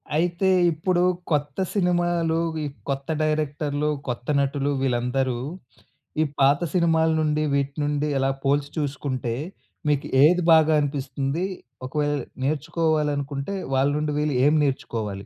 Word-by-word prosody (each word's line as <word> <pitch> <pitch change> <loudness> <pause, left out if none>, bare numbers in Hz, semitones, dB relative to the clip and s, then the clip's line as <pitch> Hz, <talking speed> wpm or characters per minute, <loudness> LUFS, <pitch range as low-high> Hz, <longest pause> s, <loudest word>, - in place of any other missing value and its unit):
అయితే, 175 +3 +1 0.2
ఇప్పుడు 175 +3 0 0.3
కొత్త 145 0 -1
సినిమాలు 175 -3 +1 0.2
వి 155 - -3 0.3
కొత్త 135 0 -2
డైరెక్టర్లు, 150 -1 -1 0.2
కొత్త 120 -1 -4
నటులు 140 +1 0
వీళ్ళందరూ, 125 0 0 0.8
ఈ - - +5 0.2
పాత 140 +1 +5
సినిమాల 165 -2 +3
నుండి, 155 0 +1
వీటి 140 0 0
నుండి, 145 0 0
ఎలా 135 0 +2
పోల్చి 140 +1 +1
చూసుకుంటే, 135 -4 -2 0.6
మీకు 145 -1 +1 0.2
ఏది 175 +3 +5
బాగా 160 -1 +6
అనిపిస్తుందీ? 140 +3 -2 0.4
ఒకవేళ 145 +1 0 0.3
నేర్చుకోవాలనుకుంటే, 150 0 -1 0.2
వాళ్ళ 135 +2 +3
నుండి 150 0 -1
వీళ్ళు 150 -2 0
ఏం 150 - +5
నేర్చుకోవాలి? 110 -7 -3
145 Hz, 120 wpm, -24 LUFS, 135-155 Hz, 0.8 s, బాగా